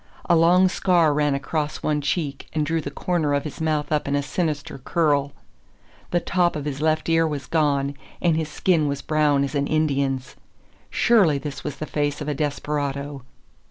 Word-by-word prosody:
A 175 - +5
long 175 +3 +5
scar 175 -4 +3
ran 145 -1 +1
across 150 +2 -3
one 150 -1 0
cheek 145 -1 -2
and 155 -1 0
drew 165 +2 0
the 140 - -5
corner 155 -1 0
of 140 - 0
his 150 +1 -7
mouth 155 -2 0
up 150 -2 0
in 140 - 0
a 145 - 0
sinister 150 -3 -3
curl. 145 0 +1 0.8
The 175 - +2
top 175 0 +1
of 150 -2 -4
his 145 -1 -4
left 155 0 +1
ear 165 0 +3
was 145 -3 -4
gone, 140 -2 +1 0.3
and 170 -3 +2
his 160 -1 -2
skin 165 -2 +1
was 140 0 -3
brown 150 -2 +2
as 140 - -3
an 140 -1 0
Indian's. 140 -4 0 0.5
Surely 195 -11 +4
this 140 -1 -6
was 145 - -4
the 155 - -5
face 145 -1 -1
of 150 - -5
a 150 - 0
desperado. 145 -1 -3
150 Hz, 190 wpm, -23 LUFS, 140-160 Hz, 0.8 s, A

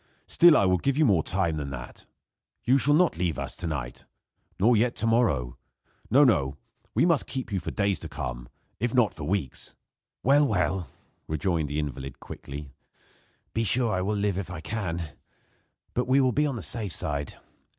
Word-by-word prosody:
Still, 170 -2 +6
I - - +3
will 90 -1 +3
give 140 +6 0
you 155 - +4
more 95 - +4
time 85 -2 0
than 70 -2 -4
that. 60 -2 -9 0.6
You 130 +3 +4
shall 145 +3 +4
not 175 - +3
leave 90 -3 0
us - - -5
to - - -4
night, 65 -6 -5 0.5
nor 115 +5 +5
yet 115 +3 +2
to 115 - 0
morrow. 115 - +1 0.5
No, 140 +5 +6
no 70 - +2 0.4
we - - +4
must 165 -5 +2
keep 130 -4 -4
you 95 - 0
for - - -5
days 100 -3 0
to 80 - -8
come, - - -5 0.3
if 120 +3 -1
not 120 -5 +3
for 80 - -7
weeks." 85 -6 -3 0.5
"Well, 145 +2 +5
well," 90 - 0 0.4
rejoined 80 -1 -1
the 75 - -3
invalid, 70 -3 -4
quickly, 70 0 -9 0.8
"be 115 - 0
sure 120 0 +2
I 90 - 0
will 105 +3 -1
live 100 -2 0
if 95 - -5
I 90 -3 -6
can; 85 -3 -3 0.9
but 125 0 -1
we 130 +2 +4
will 130 -2 +3
be 150 +4 +2
on 140 - -2
the 115 - -5
safe 105 -7 -2
side. 70 -2 -3
95 Hz, 190 wpm, -27 LUFS, 75-120 Hz, 0.9 s, Still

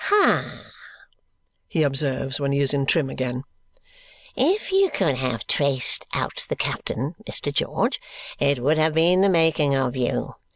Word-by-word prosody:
"Ha!" 410 0 +3 1.1
he 160 - 0
observes 135 -1 0
when 140 -1 -1
he 140 - +1
is 140 0 +1
in 140 -1 0
trim 155 -3 +2
again. 125 -1 -4 0.9
"If 400 +2 +1
you 385 0 +4
could 155 - 0
have 125 -3 -2
traced 140 -4 +1
out - - -2
the - - -1
captain, 135 +8 -3 0.2
Mr. 145 - -2
George, - - 0 0.4
it 140 0 +2
would 155 +4 +2
have 155 0 +2
been 175 +3 +4
the 200 - +4
making 160 -5 +2
of 130 -1 -1
you. 125 -2 -2
140 Hz, 155 wpm, -23 LUFS, 135-165 Hz, 1.1 s, you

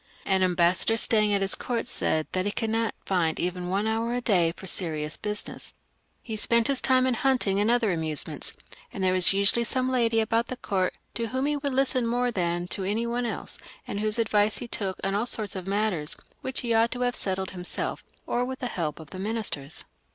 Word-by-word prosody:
An 190 -1 +2
ambas 180 -1 +3
sador 225 - +2
staying 215 -2 +3
at 200 -1 +2
his 195 - +3
court 240 -2 -2
said 160 -9 0
that 185 0 0
he - - 0
could 225 +1 -2
not 225 0 0
find 170 -4 +1
even 180 0 -2
one 195 +3 0
hour 225 +2 0
a - - 0
day 180 -8 +3
for - - -9
serious 155 -5 +1
businesa 210 0 -4 0.5
He 225 - -4
spent 230 +2 +3
his 275 -2 +4
time 260 -1 +4
in 260 - +2
hunting 240 -6 +2
and 210 +2 +2
other 235 -4 +3
amusements, 160 -3 -1 0.3
and 195 - -4
there 185 0 +3
was 185 -1 +5
usually 200 +4 +3
some 255 +2 0
lady 230 -3 +2
about 225 +1 +1
the 255 - -5
court 190 -5 -1 0.2
to 230 -1 -2
whom 260 +4 -1
he 295 0 +1
would 280 -2 -2
listen 260 -3 +3
more 245 +1 +1
than 175 -3 -1
to 195 - -2
any 210 +5 0
one 240 +1 -1
else, - - -5 0.3
and 200 - -3
whose 215 +1 +2
advice 215 -2 +2
he 245 - -5
took 195 -5 -2
on 195 - 0
all 210 +4 0
sorts 215 -5 -2
of 185 -1 -5
matters, 195 -7 -1 0.3
which 260 0 -2
he 235 -2 0
ought 225 +1 +4
to 250 - -4
have 245 0 +1
settled 190 -3 -2
himself, 180 -1 -3 0.2
or 245 - 0
with 260 +1 -4
the 255 - -5
help 160 -7 -3
of 155 -3 -12
the 185 - -5
ministers. 200 -9 -3
215 Hz, 220 wpm, -27 LUFS, 185-235 Hz, 0.5 s, was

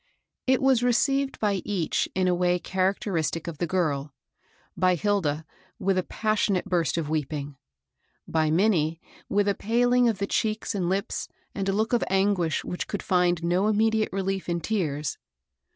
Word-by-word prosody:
It 260 0 +3
was 265 -3 +4
received 270 +3 +1
by 200 -3 +1
each 185 -6 -1
in 185 0 +2
a 180 - +3
way 180 0 +2
characteristic 185 -3 -1
of 165 -3 -6
the 175 - 0
girl, 150 -6 -1 0.3
— - - -36
by 185 0 +3
Hilda, 165 -5 0 0.3
with 195 0 +1
a. 185 - +2
passionate 210 -1 0
burst 170 -5 0
ofi 165 -3 -2
weeping; 145 -2 -3 0.7
by 160 -1 +1
Minnie, 165 -2 +2 0.3
with 205 0 +2
a 200 - +3
paling 245 +3 +2
of 220 - -1
the 200 - -1
cheeks 215 +2 -1
and 185 -4 -1
lips 195 +1 -2 0.3
and 195 -1 -2
a - - +1
look 220 +4 0
of 240 - +3
anguish 190 -5 +1
which 180 - -4
could 205 - -4
find 180 -2 +2
no 180 +4 +2
immediate 220 +1 +2
relief 195 -1 -2
in 170 0 0
tears. 155 -8 -2
190 Hz, 170 wpm, -26 LUFS, 170-210 Hz, 0.7 s, was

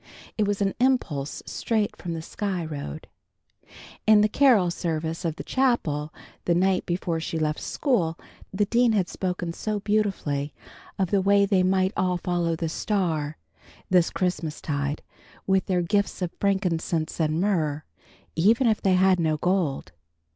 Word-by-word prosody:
It 210 -2 +1
was 205 0 0
an 195 - 0
impulse 200 - 0
straight 220 -3 -1
from 170 -2 -5
the 160 - -5
Sky 190 -2 -3
Road. 145 - -6 1.0
In 215 -1 +7
the 210 - +4
carol 215 -7 +4
service 165 0 -3
in 165 -3 -1
the - - -5
chapel, 160 - 0 0.3
the 170 - +2
night 185 +1 +2
before 175 -1 -1
she 160 0 -3
left 155 -1 -1
school, 175 - 0 0.3
the 205 +2 +1
dean 235 +2 +3
had 195 -4 +1
spoken 180 -2 -3
so 210 +3 -2
beautifully 190 -10 -1 0.4
of 190 -3 0
the 200 - +3
way 200 +1 +4
they 195 -2 +2
might 190 +1 +2
all 180 -1 +1
follow 175 -1 -1
the 165 0 -2
Star, 160 -4 -1 0.5
this 180 -2 +4
Christmastide, 150 -5 -2 0.4
with 190 -1 +2
their 180 -2 +1
gifts 200 +1 0
of 175 - -2
frankincense 175 -5 0
and 155 0 +1
myrrh, 160 -7 0 0.5
even 220 +10 +4
if 220 -2 +2
they 190 -2 +3
had 185 0 +4
no 160 -2 +1
gold. 170 - 0
180 Hz, 155 wpm, -25 LUFS, 160-200 Hz, 1.0 s, In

